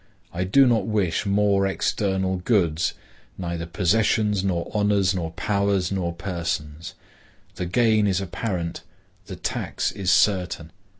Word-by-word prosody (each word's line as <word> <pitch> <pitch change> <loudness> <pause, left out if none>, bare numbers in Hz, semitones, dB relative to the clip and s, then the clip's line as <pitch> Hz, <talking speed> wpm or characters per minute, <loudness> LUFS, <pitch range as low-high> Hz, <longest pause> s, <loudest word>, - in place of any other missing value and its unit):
I 90 +2 -1
do 135 +9 +5
not 115 -6 +2
wish 100 -3 0
more 100 -1 +2
external 95 -1 0
goods,—neither 85 -2 -2
possessions, 105 +2 +1
nor 90 -3 -2
honors, 100 -3 +2
nor 85 -3 -3
powers, 100 -1 0
nor 90 -3 -1
persons. 85 -2 -4 0.6
The 90 - -4
gain 110 +2 +3
is 95 -2 +1
apparent; 90 -2 -3 0.5
the - - -6
tax - - -2
is 95 -2 -3
certain. 90 -6 +2
95 Hz, 120 wpm, -24 LUFS, 85-105 Hz, 0.6 s, do